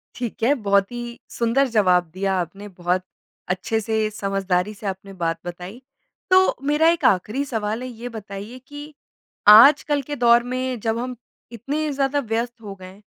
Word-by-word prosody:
ठीक 240 Hz, -2 st, -5 dB
है, 260 Hz, +5 st, +4 dB
बहुत 200 Hz, -4 st, +1 dB
ही 240 Hz, 0 st, -7 dB
सुंदर 240 Hz, +4 st, +1 dB
जवाब 185 Hz, -7 st, +2 dB
दिया 195 Hz, +1 st, -1 dB
आपने, 195 Hz, +4 st, -6 dB
बहुत 180 Hz, -1 st, -2 dB, 0.5 s
अच्छे 190 Hz, +5 st, -1 dB
से, 220 Hz, 0 st, -1 dB
समझदारी 195 Hz, -1 st, -1 dB
से, 210 Hz, +1 st, -13 dB
आपने 195 Hz, +1 st, -6 dB
बात 165 Hz, -2 st, -2 dB
बताई। 180 Hz, +7 st, -8 dB, 0.5 s
तो 375 Hz, 0 st, +5 dB
मेरा 300 Hz, +2 st, +3 dB
एक 335 Hz, 0 st, 0 dB
आखिरी 210 Hz, +8 st, +2 dB
सवाल 220 Hz, -2 st, -3 dB
है, 255 Hz, -, -5 dB
ये 240 Hz, 0 st, -8 dB
बताइए 210 Hz, +1 st, -8 dB
कि 290 Hz, +1 st, -10 dB, 0.5 s
आजकल 280 Hz, +7 st, +7 dB
के 290 Hz, +2 st, -6 dB
दौर 240 Hz, -2 st, +4 dB
में 255 Hz, 0 st, -3 dB
जब 225 Hz, +1 st, -1 dB
हम 250 Hz, +1 st, -4 dB, 0.4 s
इतने 285 Hz, +7 st, -3 dB
ज़्यादा 275 Hz, +1 st, 0 dB
व्यस्त 235 Hz, -1 st, -3 dB
हो 200 Hz, -2 st, -8 dB
गए 185 Hz, -1 st, -12 dB
हैं, 195 Hz, +3 st, -16 dB
225 Hz, 170 wpm, -22 LUFS, 195-255 Hz, 0.5 s, आजकल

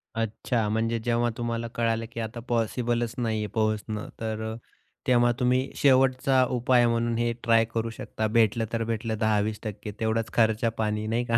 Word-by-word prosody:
अच्छा 115 Hz, 0 st, -1 dB
म्हणजे 115 Hz, +1 st, 0 dB
जेव्हा 120 Hz, 0 st, +2 dB
तुम्हाला 115 Hz, 0 st, -2 dB
कळालं 115 Hz, -1 st, 0 dB
की 115 Hz, -, -6 dB
आता 110 Hz, +1 st, -4 dB
पॉसिबलच 120 Hz, 0 st, 0 dB
नाहीये 110 Hz, -3 st, -1 dB
पोहोचणं. 110 Hz, -1 st, -1 dB
तर 110 Hz, -1 st, -3 dB
अ, -, -, -6 dB, 0.5 s
तेव्हा 120 Hz, -1 st, +4 dB
तुम्ही 125 Hz, +1 st, +1 dB
शेवटचा 130 Hz, -1 st, +4 dB
उपाय 120 Hz, 0 st, +4 dB
म्हणून 115 Hz, 0 st, 0 dB
हे 120 Hz, 0 st, +1 dB
ट्राय 115 Hz, -1 st, +4 dB
करू 115 Hz, 0 st, -1 dB
शकता 110 Hz, -1 st, -4 dB
भेटलं 115 Hz, 0 st, +3 dB
तर 115 Hz, 0 st, 0 dB
भेटलं, 115 Hz, -1 st, -2 dB
10-20% 105 Hz, -1 st, -1 dB
तेवढाच 110 Hz, 0 st, -1 dB
खर्चा-पाणी 110 Hz, -1 st, +1 dB
नाही 115 Hz, +2 st, 0 dB
का? 115 Hz, -, +5 dB
115 Hz, 155 wpm, -26 LUFS, 110-120 Hz, 0.5 s, का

